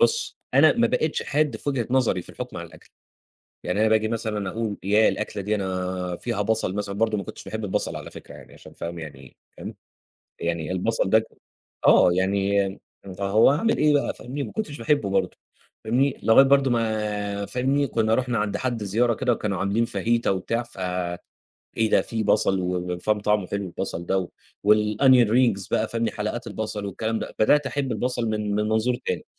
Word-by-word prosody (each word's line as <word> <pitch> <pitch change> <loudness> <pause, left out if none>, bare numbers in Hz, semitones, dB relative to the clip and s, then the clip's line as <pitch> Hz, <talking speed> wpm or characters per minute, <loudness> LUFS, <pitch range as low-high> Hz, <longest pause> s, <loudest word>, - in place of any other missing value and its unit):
بُص 465 - +2 0.2
أنا - - +7
ما - - +2
بقيتش - - 0
حاد 150 0 0
في - - -5
وجهة 130 -5 -1
نظري 125 -8 +2
في - - -11
الحُكم - - -7
على - - -6
الأكل، - - -17 0.8
يعني 90 +4 -1
أنا 110 - +4
باجي 110 0 +2
مثلًا 110 -3 -2
أقول 110 -1 -3
ياه 105 +3 +4
الأكلة 105 -1 -3
دي 105 +2 0
أنا 90 -2 -3
فيها 115 +1 -2
بصل 110 -3 0
مثلًا، 100 -1 -3
برضه 110 +1 0
ما 100 - -4
كنتش - - -9
باحب 110 0 -5
البصل 95 - -1
على - - -8
فكرة - - -10
يعني - - -14
عشان - - -14
فاهم 85 0 -6
يعني 70 -5 -10 0.2
فاهم، - - -7 0.7
يعني 85 -1 -2
البصل 95 +2 0
ده 110 +1 +4 0.6
آه 90 - +6
يعني 100 +1 0 0.4
فهو 100 +4 +4
هاعمل 185 +11 +1
إيه 150 -1 +4
بقى 145 - +1
فاهمني، 135 +4 -5
ما - - -6
كنتش 205 -10 -4
باحبه 115 -3 +1
برضه 100 - 0 0.5
فاهمني، 125 +5 +1
لغاية 115 +4 +7
برضه 135 -1 +4
ما 105 -3 -1
فاهمني، 135 +7 0
كنّا 110 -3 +1
رُحنا 125 -1 0
عند 105 -1 -1
حد 120 -4 -2
زيارة 115 +4 +2
كده 125 - 0
وكانوا 105 -5 -2
عاملين 100 +5 +1
فاهيتا 115 0 0
وبتاع 100 +5 -1
ف 120 - -12 1.0
إيه 110 -1 +2
ده - - +4
في 110 -1 -3
بصل 100 -2 +2
و 90 0 -2
وفاهم 105 +4 0
طعمه 105 -2 +1
حلو 100 +1 -3
البصل 90 -1 -4
ده 95 - +1
و 90 - -4 0.5
والonion 115 +3 +4
rings 110 -6 +2
بقى - - +1
فاهمني، 115 -1 -1
حلقات 110 +4 -4
البصل 105 0 -4
والكلام 110 +3 -2
ده، - - -7
بدأت 145 +6 +4
أحب 135 0 -2
البصل 125 -1 0
من 105 -1 -1
من 105 - +1
منظور 110 +3 +1
تاني، - - -2
110 Hz, 190 wpm, -24 LUFS, 100-120 Hz, 1.0 s, أنا